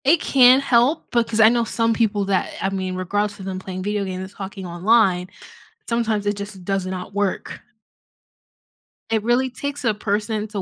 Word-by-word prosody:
It 310 +4 +5
can 255 -2 +6
help, 270 +3 +2
because 230 -2 0
I 220 0 +8
know 235 0 +2
some 230 0 0
people 210 -3 +1
that 195 -2 0
I 195 - 0
mean, 190 -1 -3
regardless 205 +3 -2
of 190 - -8
them 190 -1 -4
playing 185 0 -6
video 205 0 -1
games 185 -1 -4
and 190 - -9
talking 195 -1 -8
online, 180 0 +2 0.6
sometimes 225 -3 0
it 205 0 0
just 200 -2 -8
does 195 -1 -1
not 185 +1 -6
work. 200 -1 -2 1.5
It 220 -2 0
really 245 +3 +2
takes 285 +3 -5
a 230 -3 +2
person 210 +1 -2
to 205 -2 -4
205 Hz, 180 wpm, -21 LUFS, 190-230 Hz, 1.5 s, I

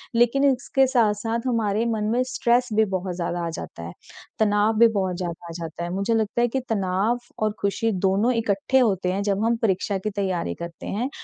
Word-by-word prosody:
लेकिन 240 +4 +3
इसके 270 +1 +1
साथ-साथ 230 -1 +1
हमारे 225 -2 +1
मन 215 - -2
में 245 - +2
स्ट्रेस 245 -1 +1
भी 220 +1 +4
बहुत 185 -1 -2
ज़्यादा 175 0 -2
आ 165 - -2
जाता 150 - -7
है। 85 - -6 0.5
तनाव 210 0 +3
भी 235 - +8
बहुत 190 -4 -1
ज़्यादा 175 -1 -5
आ - - -7
जाता 165 0 -6
है, 175 - -3
मुझे 200 +4 0
लगता 220 +1 0
है 240 - +4
कि 265 +3 -1
तनाव 200 +3 0 0.2
और 215 - +2
खुशी 205 +3 0
दोनों 205 +6 +2
इकट्ठे 230 +2 +1
होते 190 -7 +1
हैं, 195 - -1
जब 200 +1 0
हम 235 +1 +2
परीक्षा 200 -1 0
की 190 +3 -3
तैयारी 190 -4 -2
करते 170 0 -7
हैं 240 +6 -2
210 Hz, 205 wpm, -24 LUFS, 190-235 Hz, 0.5 s, भी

